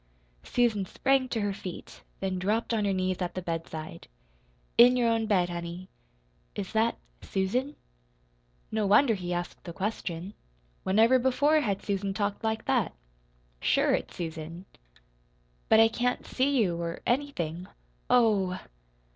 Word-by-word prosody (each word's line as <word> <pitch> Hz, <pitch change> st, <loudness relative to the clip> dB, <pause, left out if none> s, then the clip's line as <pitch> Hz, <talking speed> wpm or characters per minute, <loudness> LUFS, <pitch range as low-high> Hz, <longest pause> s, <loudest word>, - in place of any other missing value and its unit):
Susan 230 Hz, -, +1 dB
sprang 260 Hz, +7 st, +1 dB
to 225 Hz, -, -1 dB
her 205 Hz, -1 st, 0 dB
feet, 185 Hz, -2 st, -8 dB, 0.2 s
then 190 Hz, -1 st, -1 dB
dropped 215 Hz, +5 st, 0 dB
on 215 Hz, -2 st, +1 dB
her 200 Hz, -, +2 dB
knees 185 Hz, -1 st, 0 dB
at 180 Hz, -, -3 dB
the -, -, -1 dB
bedside. 165 Hz, -1 st, -5 dB, 0.7 s
"In 250 Hz, +1 st, +7 dB
your 240 Hz, -1 st, +3 dB
own 225 Hz, -1 st, +1 dB
bed 185 Hz, -5 st, +2 dB
honey." 170 Hz, +1 st, -6 dB, 0.7 s
"Is 195 Hz, -2 st, -4 dB
that 225 Hz, +1 st, +2 dB, 0.2 s
Susan?" 245 Hz, +10 st, -1 dB, 1.0 s
No 215 Hz, -2 st, 0 dB
wonder 225 Hz, +5 st, +5 dB
he 180 Hz, -3 st, -4 dB
asked 175 Hz, 0 st, -4 dB
the 170 Hz, -, -7 dB
question. 190 Hz, -2 st, -4 dB, 0.5 s
Whenever 225 Hz, +7 st, +4 dB
before 285 Hz, +5 st, +3 dB
had 200 Hz, -7 st, -2 dB
Susan 195 Hz, -1 st, -2 dB
talked 205 Hz, +1 st, -2 dB
like 220 Hz, 0 st, -1 dB
that? -, -, +1 dB, 0.7 s
"Sure -, -, +2 dB
it's -, -, -2 dB
Susan." 165 Hz, +1 st, -6 dB, 1.0 s
"But 220 Hz, -, +7 dB
I 225 Hz, -, +8 dB
can't 245 Hz, +2 st, -1 dB
see 275 Hz, +2 st, +1 dB
you 175 Hz, -7 st, +1 dB
or 170 Hz, 0 st, -4 dB
anything. 185 Hz, -, -1 dB, 0.4 s
Oh 205 Hz, -7 st, +3 dB
h!" -, -, -8 dB
200 Hz, 145 wpm, -28 LUFS, 180-235 Hz, 1.0 s, I